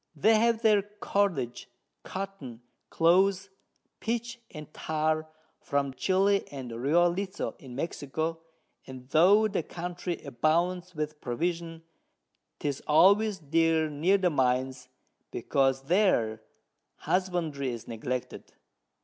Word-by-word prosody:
They 215 Hz, +9 st, +4 dB
have 230 Hz, 0 st, +2 dB
their 210 Hz, -2 st, +5 dB
Cordage, 200 Hz, -, -2 dB, 0.3 s
Cotton, 170 Hz, -12 st, -7 dB, 0.3 s
Cloth, 190 Hz, +3 st, +3 dB, 0.5 s
Pitch 235 Hz, +1 st, -3 dB
and 150 Hz, 0 st, -10 dB
Tar 155 Hz, 0 st, -1 dB, 0.3 s
from 140 Hz, -1 st, -1 dB
Chili 195 Hz, +7 st, +2 dB
and 130 Hz, -4 st, -7 dB
Rio 145 Hz, +9 st, +3 dB
Lezo 195 Hz, +2 st, -4 dB
in 130 Hz, -7 st, -11 dB
Mexico, 160 Hz, +2 st, -3 dB, 0.5 s
and 130 Hz, -1 st, -10 dB
tho' 195 Hz, +9 st, +5 dB
the 195 Hz, -, -1 dB
Country 175 Hz, +1 st, -5 dB
abounds 170 Hz, +7 st, 0 dB
with 150 Hz, 0 st, -4 dB
Provision, 165 Hz, +5 st, -3 dB, 0.7 s
'tis 140 Hz, -2 st, -3 dB
always 200 Hz, +7 st, +5 dB
dear 160 Hz, 0 st, +1 dB
near 170 Hz, +7 st, +3 dB
the 185 Hz, -2 st, +1 dB
Mines, 130 Hz, -1 st, 0 dB, 0.4 s
because 135 Hz, -1 st, 0 dB
there 135 Hz, -, +2 dB, 0.5 s
Husbandry 170 Hz, -7 st, -1 dB
is 120 Hz, -2 st, -6 dB
neglected. 125 Hz, +2 st, -5 dB
165 Hz, 105 wpm, -28 LUFS, 135-190 Hz, 0.7 s, their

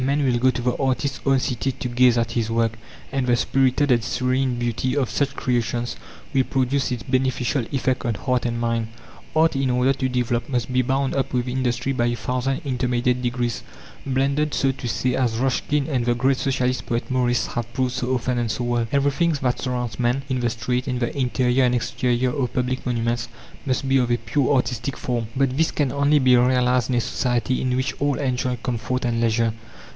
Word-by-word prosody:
Men 140 Hz, +3 st, +1 dB
will 120 Hz, -2 st, +2 dB
go 130 Hz, +2 st, +4 dB
to 125 Hz, -1 st, -2 dB
the 125 Hz, 0 st, +1 dB
artist's 135 Hz, +1 st, -1 dB
own 135 Hz, -1 st, +4 dB
city 130 Hz, +1 st, -1 dB
to 125 Hz, -, -5 dB
gaze 125 Hz, 0 st, +4 dB
at 115 Hz, 0 st, 0 dB
his 115 Hz, -2 st, -1 dB
work, 115 Hz, 0 st, +1 dB, 0.4 s
and 135 Hz, -2 st, -1 dB
the 120 Hz, -, +4 dB
spirited 135 Hz, +3 st, +2 dB
and 120 Hz, -2 st, +3 dB
serene 130 Hz, 0 st, 0 dB
beauty 120 Hz, +3 st, -1 dB
of 135 Hz, -3 st, 0 dB
such 140 Hz, -1 st, 0 dB
creations 120 Hz, -1 st, -1 dB, 0.4 s
will 135 Hz, -1 st, +4 dB
produce 135 Hz, +1 st, 0 dB
its 125 Hz, -2 st, -3 dB
beneficial 130 Hz, -1 st, 0 dB
effect 130 Hz, -2 st, 0 dB
on 115 Hz, -2 st, -1 dB
heart 125 Hz, +3 st, 0 dB
and 120 Hz, 0 st, -2 dB
mind. 115 Hz, -1 st, 0 dB, 0.5 s
Art, 160 Hz, -1 st, +4 dB
in 135 Hz, -1 st, +1 dB
order 125 Hz, +2 st, +3 dB
to 130 Hz, -1 st, -2 dB
develop, 120 Hz, -1 st, -1 dB
must 125 Hz, -1 st, -1 dB
be 130 Hz, -, +4 dB
bound 135 Hz, +2 st, 0 dB
up 135 Hz, -1 st, -1 dB
with 125 Hz, 0 st, 0 dB
industry 125 Hz, +1 st, -1 dB
by 120 Hz, -2 st, +1 dB
a 120 Hz, -, 0 dB
thousand 125 Hz, +5 st, -2 dB
intermediate 125 Hz, -1 st, 0 dB
degrees, 120 Hz, -3 st, -1 dB, 0.4 s
blended, 140 Hz, +3 st, 0 dB
so 135 Hz, -, +2 dB
to 130 Hz, -1 st, -6 dB
say, 125 Hz, +2 st, 0 dB
as 120 Hz, -4 st, 0 dB
Ruskin 135 Hz, +3 st, 0 dB
and 130 Hz, -6 st, 0 dB
the 120 Hz, 0 st, +1 dB
great 130 Hz, +2 st, +2 dB
Socialist 130 Hz, -2 st, -1 dB
poet 120 Hz, +1 st, -2 dB
Morris 125 Hz, -1 st, +1 dB
have 120 Hz, -1 st, -4 dB
proved 130 Hz, 0 st, -1 dB
so 130 Hz, 0 st, -1 dB
often 125 Hz, 0 st, -1 dB
and 120 Hz, -1 st, -1 dB
so 120 Hz, -, -2 dB
well. 120 Hz, -1 st, 0 dB
Everything 140 Hz, +4 st, +2 dB
that 125 Hz, -1 st, +1 dB
surrounds 125 Hz, -2 st, -3 dB
man, 125 Hz, +3 st, +1 dB
in 130 Hz, -2 st, -1 dB
the 120 Hz, -1 st, +1 dB
street, 125 Hz, +3 st, -2 dB
in 125 Hz, -2 st, -1 dB
the 120 Hz, +2 st, -2 dB
interior 130 Hz, -1 st, +2 dB
and 125 Hz, 0 st, +2 dB
exterior 125 Hz, +1 st, 0 dB
of 125 Hz, -2 st, -1 dB
public 130 Hz, 0 st, -1 dB
monuments, 120 Hz, -1 st, -1 dB, 0.4 s
must 130 Hz, +1 st, 0 dB
be 135 Hz, 0 st, +4 dB
of 125 Hz, -2 st, +1 dB
a 120 Hz, -, +2 dB
pure 125 Hz, +5 st, 0 dB
artistic 125 Hz, 0 st, -1 dB
form. 120 Hz, -3 st, -2 dB
But 135 Hz, -1 st, +1 dB
this 160 Hz, +3 st, +2 dB
can 145 Hz, -3 st, 0 dB
only 140 Hz, +1 st, +3 dB
be 130 Hz, -3 st, +5 dB
realized 125 Hz, -1 st, +3 dB
in 125 Hz, -, +1 dB
a 120 Hz, -, +2 dB
society 120 Hz, +1 st, 0 dB
in 125 Hz, -1 st, 0 dB
which 130 Hz, +1 st, -1 dB
all 145 Hz, -1 st, +2 dB
enjoy 130 Hz, -2 st, -1 dB
comfort 125 Hz, +1 st, -2 dB
and 120 Hz, -1 st, 0 dB
leisure. 115 Hz, -1 st, +2 dB
125 Hz, 210 wpm, -23 LUFS, 120-130 Hz, 0.5 s, be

